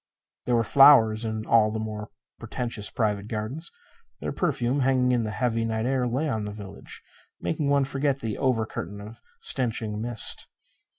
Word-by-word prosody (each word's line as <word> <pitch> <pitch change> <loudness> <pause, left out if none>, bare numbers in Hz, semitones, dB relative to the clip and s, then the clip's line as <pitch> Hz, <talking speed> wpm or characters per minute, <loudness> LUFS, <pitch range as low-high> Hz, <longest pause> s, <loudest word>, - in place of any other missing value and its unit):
There 125 - +3
were 115 - +3
flowers 115 -4 +6
in 110 -1 -3
all 110 -2 +4
the 110 - -3
more 110 -1 -5 0.3
pretentious 115 -4 -4
private 105 -3 -1
gardens. 115 +10 -5 0.5
Their - - -4
perfume, 135 -6 0
hanging 130 -1 +2
in 120 -2 +1
the - - -3
heavy 115 +1 -1
night 110 0 -1
air, 130 -1 +1
lay 130 +6 -1
on 110 -7 -2
the 105 - -5
village, 100 -1 -10 0.4
making 155 -3 -1
one 140 -1 +3
forget 135 0 -1
the 110 -4 -4
over 125 -5 +1
curtain 100 -1 -6
of 105 +3 -11 0.2
stenching 115 -4 -1
mist. 120 -1 +2
115 Hz, 170 wpm, -26 LUFS, 110-130 Hz, 0.5 s, flowers